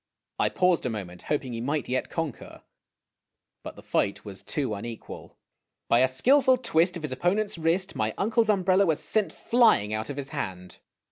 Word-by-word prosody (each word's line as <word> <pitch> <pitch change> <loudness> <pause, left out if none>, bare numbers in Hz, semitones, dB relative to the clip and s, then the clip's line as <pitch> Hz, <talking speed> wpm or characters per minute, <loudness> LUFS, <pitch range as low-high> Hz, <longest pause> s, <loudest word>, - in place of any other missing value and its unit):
I - - +3
paused 180 -7 +2
a - - -1
moment, 95 -6 -6
hoping 135 -4 -1
he 115 - -4
might 145 +3 -2
yet 130 +1 -2
conquer, 165 -6 -5 1.0
but - - -8
the - - -13
fight 100 - -1
was 100 -2 -7
too 135 -7 -2
unequal. 115 +2 -8 0.5
By 115 - +5
a 130 - +5
skilful 260 - +4
twist 175 -6 +1
of 165 - -10
his 155 - -3
opponent's 185 +10 0
wrist 170 +4 0
my 110 0 -1
uncle's 225 +2 +1
umbrella 190 -1 +3
was 160 -3 +1
sent 215 -2 0
flying 225 - +3
out 110 +1 -3
of 145 - -5
his 140 -1 -4
hand. 95 - -6
150 Hz, 180 wpm, -26 LUFS, 115-190 Hz, 1.0 s, By